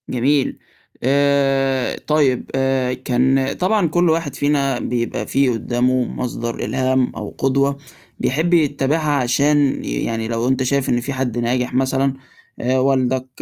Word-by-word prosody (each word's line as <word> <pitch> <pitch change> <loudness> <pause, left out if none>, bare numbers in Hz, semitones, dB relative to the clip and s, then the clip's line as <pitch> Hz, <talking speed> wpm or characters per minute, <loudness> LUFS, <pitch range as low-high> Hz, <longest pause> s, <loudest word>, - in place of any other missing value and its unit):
جميل. 135 +3 0 0.4
آآ 135 -1 +2
طيب 145 -5 +1
آآ 135 -1 +1
كان 130 +1 +1
طبعًا 190 0 +1
كل 175 +2 +2
واحد 160 -4 -1
فينا 140 -3 0
بيبقى 120 -1 -3
فيه 135 -1 +2
قدّامه 125 +2 0
مصدر 120 -2 -4
إلهام 130 0 +1
أو - - -7
قدوة 140 +1 +1 0.4
بيحب 160 +6 0
يتّبعها 150 -1 +1
عشان 140 +2 +2
ي - - -2
يعني 115 -1 -2
لو 115 +1 -1
أنت 130 0 +1
شايف 140 +1 0
إن 120 - +1
في 140 +3 -4
حد 130 -3 -2
ناجح 125 +1 -1
مثلًا 135 +1 +1 0.5
آآ 130 +2 +1
والدك، 130 -1 +1
135 Hz, 140 wpm, -19 LUFS, 125-140 Hz, 0.5 s, آآ